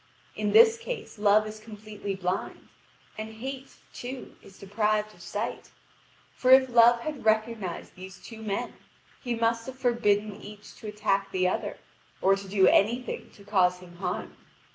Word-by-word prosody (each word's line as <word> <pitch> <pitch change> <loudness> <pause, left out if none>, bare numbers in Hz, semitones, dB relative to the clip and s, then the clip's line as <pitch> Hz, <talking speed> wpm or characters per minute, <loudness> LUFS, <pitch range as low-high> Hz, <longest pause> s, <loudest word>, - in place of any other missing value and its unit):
In 210 -1 -1
this 460 - +7
case 470 - -6
Love 210 +1 +4
is 215 0 -8
completely 210 -2 -7
blind, 185 0 -4 0.5
and 220 0 -6
Hate, 265 +3 -7 0.2
too, 255 +1 -7
is 190 - -16
deprived 210 +1 0
of 175 - -18
sight. 205 +6 -4 0.6
For 255 - -1
if 260 0 +7
Love 235 0 +6
had 300 0 -5
recognised 220 -4 -1
these 185 0 -11
two 225 -1 -11
men, 205 -2 -3 0.5
he 245 -3 -1
must 230 +1 0
have 260 0 -7
forbidden 215 -5 +1
each 210 0 -11
to 220 - -9
attack 200 -2 0
the 185 -1 +1
other, 185 - -2 0.4
or 195 +1 +4
to 195 0 -8
do 190 -1 +3
any 220 +6 +4
thing - - -6
to 200 - -15
cause 185 -3 +3
him 175 -1 -14
harm. 185 - -4
215 Hz, 165 wpm, -27 LUFS, 195-235 Hz, 0.6 s, this